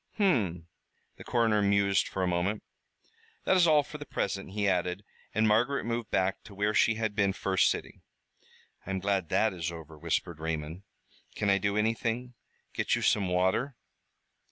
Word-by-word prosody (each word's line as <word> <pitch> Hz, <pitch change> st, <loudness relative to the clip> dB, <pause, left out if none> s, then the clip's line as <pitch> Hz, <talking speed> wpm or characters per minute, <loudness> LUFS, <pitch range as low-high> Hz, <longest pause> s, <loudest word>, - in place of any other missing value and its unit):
"Hum!" 105 Hz, -, +1 dB, 0.5 s
The -, -, -10 dB
coroner 115 Hz, -3 st, +2 dB
mused 100 Hz, -1 st, +2 dB
for 95 Hz, -, -3 dB
a -, -, +1 dB
moment. 90 Hz, +4 st, -1 dB, 0.8 s
"That -, -, +3 dB
is 175 Hz, -2 st, +5 dB
all 150 Hz, -2 st, +5 dB
for 150 Hz, -, -9 dB
the 145 Hz, -, -7 dB
present," 100 Hz, 0 st, -3 dB
he 100 Hz, +1 st, -1 dB
added, 90 Hz, +1 st, 0 dB, 0.3 s
and 110 Hz, +1 st, +3 dB
Margaret 120 Hz, +6 st, +2 dB
moved 115 Hz, -1 st, -3 dB
back 95 Hz, +1 st, 0 dB
to 100 Hz, -, -12 dB
where 105 Hz, +2 st, 0 dB
she 115 Hz, +1 st, +3 dB
had 110 Hz, -2 st, -2 dB
been 100 Hz, -2 st, +2 dB
first 95 Hz, -1 st, +2 dB
sitting. -, -, -4 dB, 0.9 s
"I -, -, -6 dB
am 95 Hz, -1 st, -1 dB
glad 95 Hz, -3 st, -1 dB
that 110 Hz, -2 st, +2 dB
is 85 Hz, -2 st, -3 dB
over," 80 Hz, -2 st, -10 dB
whispered 85 Hz, +2 st, -2 dB
Raymond. 80 Hz, +2 st, -4 dB, 0.5 s
"Can 100 Hz, -1 st, +1 dB
I 100 Hz, -, +3 dB
do 100 Hz, +1 st, 0 dB
anything? 115 Hz, +3 st, -1 dB, 0.4 s
Get -, -, +1 dB
you -, -, -3 dB
some 100 Hz, -3 st, +2 dB
water?" 95 Hz, +9 st, +1 dB
100 Hz, 175 wpm, -29 LUFS, 90-115 Hz, 0.9 s, is